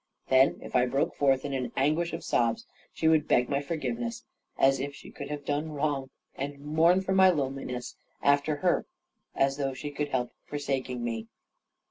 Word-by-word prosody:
Then, 130 +1 +5
if - - -8
I 125 0 +4
broke 135 +3 0
forth 135 -1 +2
in 140 - -3
an 125 -3 -2
anguish 155 +5 +2
of 165 - -5
sobs, 115 -1 +1 0.3
she 160 - 0
would 155 -1 +4
beg 125 0 +3
my 140 0 +1
forgiveness, 125 -6 -3 0.3
as 135 0 +4
if 140 +1 -4
she - - -12
could 140 0 -7
have 145 -1 -5
done 150 +2 -1
wrong, 140 -2 -1 0.2
and 140 +1 -5
mourn 160 +6 +3
for 190 - -3
my 190 0 +7
loneliness 135 -5 -2 0.3
after 145 +2 +3
her, 175 +4 +1 0.5
as 135 0 +2
though 135 -2 -1
she 145 +2 -5
could 145 +1 -2
help 125 -3 -1 0.2
forsaking 135 -4 -2
me. 115 -1 -3
140 Hz, 180 wpm, -29 LUFS, 130-150 Hz, 0.5 s, my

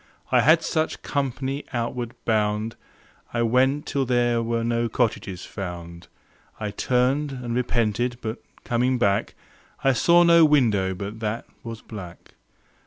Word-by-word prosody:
I 125 -1 +5
had 160 +6 +5
such 160 -1 -1
company 135 0 -2
outward 120 0 -3
bound. 110 0 0 0.6
I 120 - +2
went 130 +5 +2
till 140 - 0
there 120 -2 +2
were 115 0 -1
no 115 0 0
cottages 100 -6 -1
found. 85 -3 -7 0.5
I 105 -1 -3
turned 130 +6 +1
and 125 -3 -5
repented, 120 -1 0
but 110 0 -5 0.2
coming 125 +2 +1
back 100 -4 +1 0.5
I 135 - +4
saw 170 +7 +5
no 170 -1 +7
window 110 -11 +3
but 100 +4 -6
that 110 +1 -3 0.2
was 115 -1 -7
black. 95 -6 -10
120 Hz, 135 wpm, -24 LUFS, 110-130 Hz, 0.6 s, no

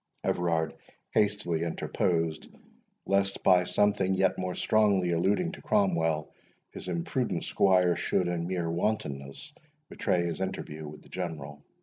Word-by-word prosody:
Everard 85 -2 0 0.4
hastily 105 -6 +1
interposed, 85 -1 -1 0.6
lest 100 0 +1
by 90 -1 +5
something 100 -1 +2
yet 95 0 +2
more 90 -1 -3
strongly 100 -5 +2
alluding 100 - +1
to 190 - -10
Cromwell, 80 -7 +1 0.4
his - - -8
imprudent 85 -1 -1
squire 90 -3 +3
should, 90 - 0
in 85 -1 -2
mere 85 -3 -1
wantonness, 85 - -3 0.4
betray 85 -1 0
his 85 +2 -3
interview 80 -5 -4
with 75 +1 -10
the - - -18
General. 75 -5 -6
90 Hz, 125 wpm, -29 LUFS, 80-95 Hz, 0.6 s, by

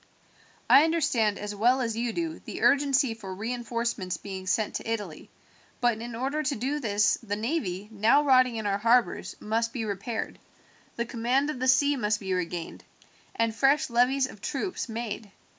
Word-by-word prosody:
I 275 - +8
understand 290 -11 +1
as 210 0 -5
well 240 +6 +3
as 230 -3 -1
you 235 +1 -1
do 325 +4 -3
the - - -7
urgency 275 -3 +3
for 195 -4 -8
reinforcements 230 -4 -3
being 190 0 -7
sent 210 +3 0
to 225 - -5
Italy; 205 -8 -5 0.5
but 240 -3 +1
in 235 0 -6
order 270 +6 -1
to 290 -1 -1
do 270 +6 -2
this 210 -5 +2
the 205 -3 -3
navy, 210 - -2
now 220 +7 +4
rotting 255 -3 +4
in 220 -1 -4
our 200 0 0
harbours, 235 +3 +2
must 230 +2 -1
be 230 -4 -3
repaired, 210 +3 -4 0.6
the 235 - -2
command 250 +5 0
of 255 - -7
the 260 - -1
sea 285 +2 +4
must 210 -3 0
be 190 -2 -3
regained, 175 -2 -4 0.5
and 230 -1 +1
fresh 280 +2 +2
levies 255 +3 +3
of 215 -6 -11
troops 300 -1 -3
made. 220 -2 -5
235 Hz, 175 wpm, -27 LUFS, 210-265 Hz, 0.6 s, I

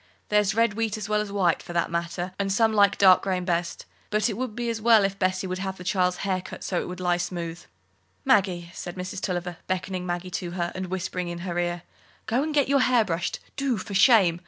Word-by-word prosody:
There's 210 -1 +2
red 230 -2 +3
wheat 220 0 -1
as 210 -1 -5
well 210 0 +1
as 210 -1 -5
white, 185 -5 +1
for 175 - -9
that 170 -1 0
matter, 170 +2 -3
and 195 -1 0
some 220 +2 +3
like 200 -1 +5
the 200 - +3
dark 185 -1 +8
grain 185 -2 -1
best. 170 -1 -2 0.2
But 215 +2 +1
it - - -3
would 245 -1 -4
be 240 0 -3
as 230 -1 -2
well 225 -2 +6
if 195 0 -1
Bessie 185 0 0
would 185 0 -3
have 190 0 -4
the 180 - -9
child's 180 -1 +1
hair 185 -2 0
cut - - -9
so 180 - -1
it - - -6
would 180 0 -7
lie 175 -1 +1
smooth." 175 -1 -4 0.6
"Maggie," 180 -4 +2
said 175 -1 -7
Mrs. 185 +1 -5
Tulliver, 180 -2 -3
beckoning 185 0 -3
Maggie 175 +1 -3
to 175 0 -4
her, 175 -1 -2
and 185 0 -4
whispering 180 0 -3
in 175 0 -5
her 175 -1 -2
ear, 175 0 -2 0.4
"go 230 +4 +1
and 310 +2 -2
get 290 -3 +2
your 280 0 +3
hair 250 -3 +4
brushed, 170 -1 -2 0.2
do, 275 -4 0
for 200 +1 -6
shame! 190 -4 +5
185 Hz, 240 wpm, -26 LUFS, 175-210 Hz, 0.6 s, dark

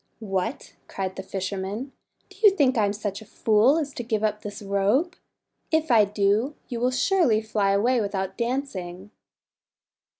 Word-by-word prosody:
4 220 -3 -9
What!' 195 +7 -3
cried 190 -1 -4
the 190 - -5
fisherman, 195 +6 -4 0.4
"do 390 - -16
you 425 - +9
think 275 -7 +3
I'm 205 -3 +2
such 205 0 -4
a - - -12
fool 220 +7 +3
as 290 -3 -2
to - - -5
give 220 -2 -2
up 210 -1 0
this 205 -1 -7
robe? 205 - +1 0.5
If 315 -2 +1
I 220 -3 +6
do, 210 +7 +1
you 240 -3 -3
will 250 +1 +2
surely 255 - +2
fly 215 -2 0
away 230 +5 +2
without 190 -2 -3
dancing." 210 -7 -4
215 Hz, 165 wpm, -25 LUFS, 200-255 Hz, 0.5 s, you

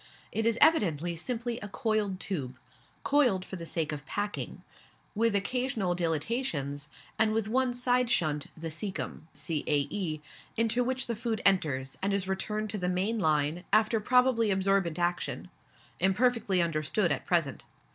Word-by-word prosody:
It 225 +1 0
is 230 0 +2
evidently 175 - +4
simply 240 +6 -3
a 205 - -6
coiled 210 -3 -1
tube 135 -12 -3 0.5
coiled 245 -11 +3
for - - -7
the 170 -2 -7
sake 160 -2 -1
of 145 -2 -5
packing 205 0 -4 0.5
with 225 0 +2
occasional 220 -2 0
dilatations, 160 - -1 0.3
and 220 -1 +3
with 220 -1 0
one 255 +3 +2
side 245 0 +1
shunt, 155 -10 +1
the 165 0 -4
caecum 160 -1 -5
(cae.), 155 +2 -1 0.4
into 230 +2 +2
which 260 +1 +1
the 235 - -2
food 225 -1 -2
enters, 140 -9 +1
and 195 +1 0
is 195 -1 -2
returned 210 +3 -2
to 210 - -3
the 180 0 0
main 195 +5 0
line, 155 0 +1
after 215 +2 +4
probably 250 0 +3
absorbent 190 -3 +1
action, 175 0 -2 0.5
imperfectly 195 -2 +2
understood 165 +3 0
at 140 - -2
present. 165 -6 0
195 Hz, 145 wpm, -29 LUFS, 165-230 Hz, 0.5 s, evidently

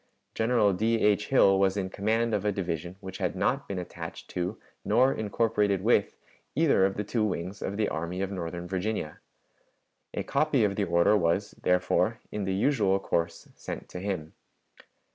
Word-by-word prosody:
General 110 -3 +2
D. 110 +5 +1
H. 105 0 +2
Hill 95 -7 +5
was 95 0 +2
in 95 -2 -2
command 110 +3 0
of 105 -2 0
a 105 - +2
division 85 -2 -3
which 95 -1 -8
had - - -1
not - - 0
been 100 - -4
attached 85 -2 -7
to 90 +5 -2 0.3
nor 125 +5 +4
incorporated 105 -2 0
with 110 -2 +2 0.4
either 145 -11 +4
of 95 - -5
the 105 - -2
two 110 +2 -1
wings 95 -2 -3
of 100 - -3
the 105 -1 +1
Army 85 +3 -3
of 95 - -3
Northern 85 -2 -5
Virginia. 95 -3 -3 1.0
A - - -1
copy 150 -6 +2
of 100 -1 +1
the 100 - 0
order 85 +4 +4
was, 95 +2 +1
therefore, 90 0 +2
in 105 -2 -3
the 95 0 -1
usual 100 -4 +2
course, 85 -3 -2
sent - - -7
to 90 - -6
him. 90 -5 -4
100 Hz, 175 wpm, -28 LUFS, 90-105 Hz, 1.0 s, Hill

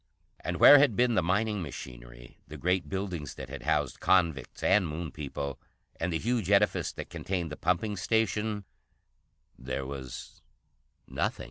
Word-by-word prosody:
And - - -3
where 145 - +10
had 140 -7 +4
been 125 +1 +3
the 95 - +3
mining 100 +4 0
machinery, - - -9
the - - -9
great 90 +1 0
buildings 95 -7 -4
that 65 -1 -8
had 70 0 -7
housed - - 0
convicts 80 -8 +1
and 100 -4 +4
Moon 80 +1 -5
people, 70 -2 -5 0.4
and 85 +2 -1
the 80 - +1
huge 115 0 -1
edifice 105 0 +3
that - - -8
contained 90 -4 -3
the - - -4
pumping 90 +6 0
station, 110 +1 0 1.0
there 65 +1 -4
was 65 -1 -8 0.7
nothing. - - -2
90 Hz, 150 wpm, -29 LUFS, 70-105 Hz, 1.0 s, where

